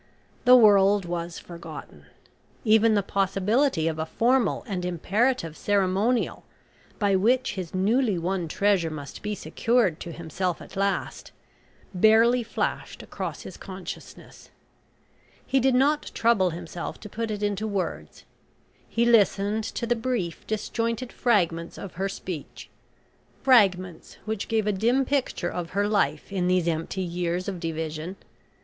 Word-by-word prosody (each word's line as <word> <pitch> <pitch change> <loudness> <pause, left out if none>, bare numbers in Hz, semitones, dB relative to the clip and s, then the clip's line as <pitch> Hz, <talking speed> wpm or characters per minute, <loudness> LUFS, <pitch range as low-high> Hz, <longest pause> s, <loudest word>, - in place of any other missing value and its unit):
The 250 +1 +9
world 205 -4 +5
was 170 0 -4
forgotten. 170 -1 -10 0.6
Even 220 0 +5
the 200 - +2
possibility 195 - +1
of 160 -1 -2
a 160 - -1
formal 245 +5 +1
and 185 -4 -3
imperative 180 +1 0
ceremonial 205 +5 +1 0.5
by 200 -2 +2
which 245 +7 +2
his 185 -3 -6
newly 210 +2 +2
won 175 0 -2
treasure 195 0 +1
must 145 -3 -8
be 210 0 -3
secured 225 -7 +1
to 170 - -7
himself 170 +2 -3
at - - -12
last, 195 0 -2 0.6
barely 225 +6 +5
flashed 230 - -3
across - - -6
his - - -9
consciousness. - - -10 1.0
He 270 - +2
did 260 0 +3
not 290 +4 +2
trouble 225 -6 +3
himself 170 0 -6
to - - -8
put 225 +2 -4
it 210 -1 -3
into 205 +1 -1
words. 200 -3 -4 0.7
He 235 +1 +1
listened 215 -2 +3
to 235 - -3
the 240 +1 +1
brief 225 -8 -3
disjointed 230 +3 -2
fragments 170 -8 0
of 195 - -8
her 195 +2 -2
speech 185 -5 -7 0.7
fragments 190 -9 +3
which 220 -2 -3
gave 220 -2 0
a 210 - +2
dim 235 +7 +2
picture 260 -10 -1
of 175 -1 -4
her 205 0 +2
life 205 -1 0
in 180 -2 0
these 180 -2 +2
empty 165 +3 -2
years 175 0 -2
of 190 -3 -4
division. 160 +1 -4
200 Hz, 140 wpm, -26 LUFS, 175-230 Hz, 1.0 s, The